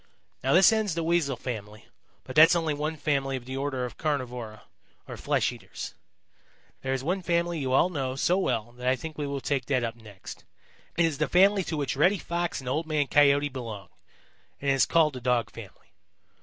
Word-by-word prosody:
"Now 135 - +2
this 185 +5 +7
ends 215 -6 0
the 165 - -1
Weasel 160 -5 +1
family, 105 -3 -7 0.4
but - - -9
that's 160 +3 +8
only 165 -3 0
one 150 +2 -3
family 140 -2 0
of 120 - -10
the 130 +1 -6
order 135 -2 -2
of 120 - -9
Carnivora, 125 -7 -3 0.4
or - - -7
flesh - - 0
eaters. - - -8 0.9
There 130 - -3
is 130 - -4
one 180 +6 -1
family 170 -1 0
you 130 -2 -2
all 170 - +4
know 135 -5 -2
so 175 +7 +2
well 115 - -1
that 125 - -4
I 130 - +4
think 160 +3 -8
we 145 - -2
will 140 -1 -4
take 135 -3 -1
that 130 -3 +1
up 115 -1 -3
next. 105 -5 -11 0.5
It 170 - +4
is 155 -4 -2
the - - +1
family 195 +2 +4
to 160 - -3
which 140 -2 -2
Reddy 180 +9 +3
Fox 170 0 -3
and 130 - -11
Old 155 +5 -1
Man 150 -2 +1
Coyote 145 +1 +4
belong, 115 -8 -7 0.7
and 140 0 0
it - - +4
is 135 - +3
called 155 -3 +3
the 125 - -7
Dog 125 -1 0
family. 100 -6 -13
140 Hz, 210 wpm, -27 LUFS, 125-165 Hz, 0.9 s, that's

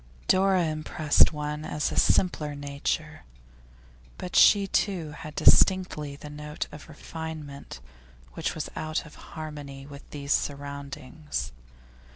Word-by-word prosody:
Dora 190 -1 +4
impressed 155 -1 +3
one 150 0 -4
as 150 -1 -1
a - - -4
simpler 150 -5 +2
nature, 140 0 -3 1.0
but 180 - -6
she 200 -1 +7
too 185 -5 0
had 150 0 -9
distinctly 180 -7 +4
the 145 - -10
note 150 +1 -5
of 150 +2 -11
refinement 155 - -7 0.5
which - - -2
was - - -3
out 155 +1 -2
of 150 - -13
harmony 145 -3 -8
with 140 0 -12
these 140 -1 -1
surroundings. 140 - -4
150 Hz, 120 wpm, -27 LUFS, 140-160 Hz, 1.0 s, she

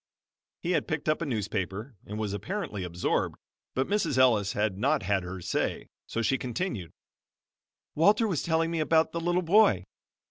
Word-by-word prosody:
He 175 - 0
had 180 - +1
picked 160 -3 -3
up 155 +2 +2
a 165 - -1
newspaper 105 0 -3
and 105 - -5
was 105 -2 -2
apparently 110 - -4
absorbed, 90 0 -1 0.4
but 130 - +1
Mrs. 200 -8 0
Ellis 115 -6 +4
had 105 -2 0
not 140 +5 +2
had 100 -1 +1
her 90 +1 -6
say, - - -2 0.2
so 115 - -2
she 135 +4 +1
continued 120 - -3 1.0
"Walter 210 +8 +4
was 175 -8 0
telling 165 0 +1
me 165 - -1
about 160 +1 +3
the 170 - -2
little 175 +2 +1
boy. 170 - +5
135 Hz, 170 wpm, -28 LUFS, 105-170 Hz, 1.0 s, boy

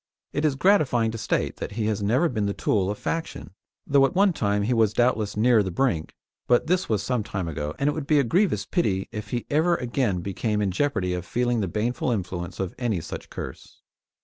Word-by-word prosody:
It 145 +2 0
is 145 -3 +2
gratifying 135 - +3
to 115 - -6
state - - -1
that - - -5
he 110 0 -2
has 105 -1 -1
never 125 +12 +2
been 110 -8 -1
the 100 - -2
tool 95 -2 +1
of 105 - -3
faction, 165 - -4 0.3
though 140 -1 +4
at - - -9
one 195 0 +4
time 100 -6 0
he 120 +5 +1
was 110 -3 +3
doubtless 110 -4 +1
near 115 0 +5
the 95 - -2
brink; 90 -5 -1 0.3
but 120 - +3
this 180 +2 0
was 105 -3 +1
some 125 +2 0
time 95 -4 -4
ago, 75 -1 -4
and 140 - 0
it 150 - +2
would 150 -3 -5
be 155 - +4
a - - +4
grievous 180 - +1
pity 100 - 0
if 105 0 -6
he 120 -1 -3
ever 160 +4 +3
again 120 - -1
became 105 +3 -2
in 100 -2 0
jeopardy 95 -5 0
of 90 -1 -3
feeling 120 +4 0
the 100 - 0
baneful 115 +7 -1
influence 90 -5 -3
of 95 -2 -2
any 115 -7 0
such 80 - -7
curse. - - -9
115 Hz, 225 wpm, -25 LUFS, 100-135 Hz, 0.3 s, near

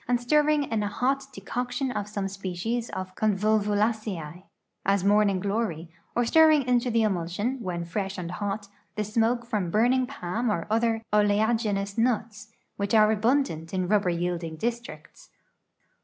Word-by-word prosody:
and 245 0 +2
stirring 300 +4 +3
in 225 -5 -1
a 205 - -1
hot 270 +6 0
decoction 250 +1 -3
of 205 -4 -3
some 205 -2 -3
s|>ccies 195 +5 -3
ofconvolvulaceae, 205 -2 -1 0.4
as 195 -1 +2
morning 200 -1 +3
glory, 195 -5 -2 0.2
or 240 - +2
stirring 310 +2 +5
into 245 0 +1
the 230 -1 +2
emulsion, 205 +6 -1
when 175 -4 -3
fresh 195 +3 -3
and 175 -2 -5
hot, 205 +2 -3 0.3
thesmoke 225 +3 0
from 210 -7 -2
l)urningpalm 240 -2 +1
or 170 -6 -1
other 225 0 +1
oleag 210 +2 +3
inous 200 0 -2
nuts, 225 -2 -1 0.3
which 200 +2 0
are 215 0 +5
alnindant 210 - 0
in 185 -1 0
rubber 200 -2 +2
yielding 170 -1 -2
districts. 235 - -6
210 Hz, 140 wpm, -26 LUFS, 190-235 Hz, 0.4 s, stirring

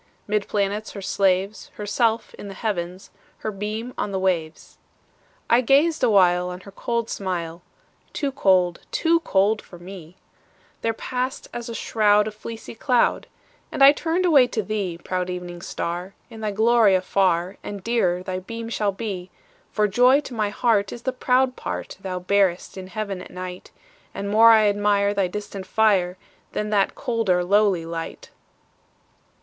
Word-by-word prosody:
'Mid 210 -1 -1
planets 205 +1 -1
her 200 - -7
slaves, 195 +2 0
Herself 220 +2 0
in - - -9
the 195 - -8
Heavens, 185 -3 -4 0.3
Her 215 - -4
beam 215 +4 -5
on 205 - -2
the 190 - -1
waves. 175 -4 -2 0.7
I 235 +2 +4
gazed 290 +6 +3
awhile 180 -4 +4
On 180 +1 -7
her 200 - -12
cold 235 +3 -2
smile; 175 -5 -4 0.5
Too 285 -2 -2
cold—too 190 - +2
cold 210 -6 +1
for 175 - -14
me— 180 -1 -11 0.6
There 230 - +1
passed, 255 +2 -4
as 240 -1 -5
a 230 - -5
shroud, 210 -2 +3
A - - -3
fleecy 225 +2 -9
cloud, 245 +1 +1 0.4
And 275 - +2
I 275 - +10
turned 330 +4 -1
away 285 -8 +6
to 225 -3 -2
thee, 195 -5 -3
Proud 180 +1 -3
Evening 175 -1 -6
Star, 175 +4 -4 0.2
In 220 -1 -10
thy 215 - -1
glory 220 -1 +4
afar 185 0 +1
And 200 -2 -7
dearer 185 -7 +1
thy 185 0 -3
beam 230 +4 -7
shall 210 -3 0
be; 195 -3 -5 0.4
For 210 -1 +2
joy 250 +7 +5
to 265 - -9
my 215 -3 0
heart 210 -2 +1
Is 240 - -8
the 260 - -1
proud 255 0 +2
part - - -5
Thou 185 -1 -4
bearest 185 -1 +1
in 190 -1 -7
Heaven 200 -2 -4
at - - -10
night, 180 0 -8 0.5
And 200 0 -4
more 225 +2 +7
I 220 -2 +6
admire 205 0 +2
Thy 195 -2 +1
distant 200 0 -7
fire, 190 -5 +2 0.4
Than 210 0 -2
that 200 -2 +2
colder, 225 -9 0
lowly 195 -2 +2
light. 165 0 -6
205 Hz, 160 wpm, -23 LUFS, 185-230 Hz, 0.7 s, I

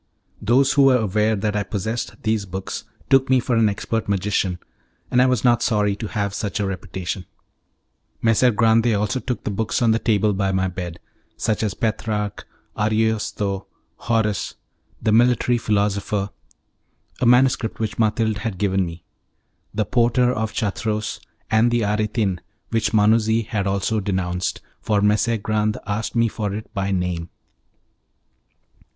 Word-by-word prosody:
Those 135 +4 +3
who 145 - +4
were 130 -2 +6
aware 110 0 +1
that 105 +1 -1
I 105 - +1
possessed 110 +3 -3
these 110 -2 0
books 95 +3 -5 0.3
took 135 -1 +5
me 130 -1 +5
for 120 0 0
an 115 -2 +4
expert 105 +2 -3
magician, 95 -2 0 0.5
and 125 - +4
I 130 - +5
was 125 -4 +1
not 120 -2 +4
sorry 105 -3 +1
to 110 - -4
have 100 -2 -2
such 100 -1 -3
a 100 - 0
reputation. 90 -1 -5 0.9
Messer 115 +2 +4
Grande 115 0 +3
took 115 -3 +3
also 105 +5 0
the 120 -5 -3
books 110 +2 -1
on 120 -3 +3
the 110 - +2
table 105 -2 +2
by 95 0 0
my 95 0 +1
bed, 90 -2 -6 0.4
such 110 -2 0
as 105 -4 -1
Petrarch, 105 -2 -2 0.3
Ariosto, 105 -2 0 0.3
Horace. 110 -3 -1 0.4
"The 110 - 0
Military 120 +1 +3
Philosopher" 100 -2 0 0.9
(a - - +1
manuscript 125 -2 +3
which 110 0 -3
Mathilde 110 -1 +1
had 110 -3 -4
given 95 -1 +1
me), 85 -1 -7 0.7
"The 110 0 -1
Porter 125 0 +2
of 110 -2 -2
Chartreux," 110 0 -1 0.5
and 110 +2 +4
"The 120 -1 +1
Aretin," 105 -2 0 0.3
which 110 -2 +1
Manuzzi 110 +1 +3
had 100 -2 -2
also 100 +3 0
denounced, 95 -2 -2 0.2
for 105 -2 +1
Messer 105 +3 +2
Grande 110 0 0
asked 105 +3 -3
me 115 0 +3
for 105 -2 -3
it 110 - -8
by 100 -1 -1
name. 90 -3 -2
105 Hz, 150 wpm, -22 LUFS, 100-115 Hz, 0.9 s, were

